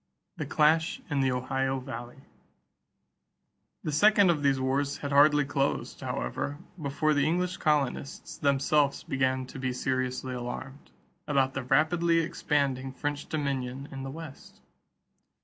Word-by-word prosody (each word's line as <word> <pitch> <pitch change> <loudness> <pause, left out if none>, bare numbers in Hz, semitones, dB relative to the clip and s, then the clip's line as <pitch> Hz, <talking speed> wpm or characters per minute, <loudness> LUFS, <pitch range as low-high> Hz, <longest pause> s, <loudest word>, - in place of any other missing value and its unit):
=The - - -4
Clash 160 +9 +3
in 145 - +1
the 135 -1 +2
Ohio 135 +1 -1
Valley.= 125 +1 -8 1.6
The 155 - -2
second 200 +4 +5
of 155 -3 -1
these 140 -2 +2
wars 135 +2 0
had 140 - -5
hardly 145 +1 +5
closed, 140 0 -1
however, 100 - -3 0.2
before 155 +2 +1
the 145 0 +2
English 180 +2 0
colonists 145 -3 -1
themselves 140 +1 +2
began 130 -1 0
to 130 - -9
be 130 -1 -1
seriously 130 0 -2
alarmed 125 +3 -6 0.4
about 135 -2 +2
the 135 - -2
rapidly 160 +6 +2
expanding 140 -5 0
French 145 +2 -4
dominion 140 -2 -3
in 135 -1 -6
the 135 - -5
West. 155 -1 -10
140 Hz, 130 wpm, -28 LUFS, 130-150 Hz, 1.6 s, second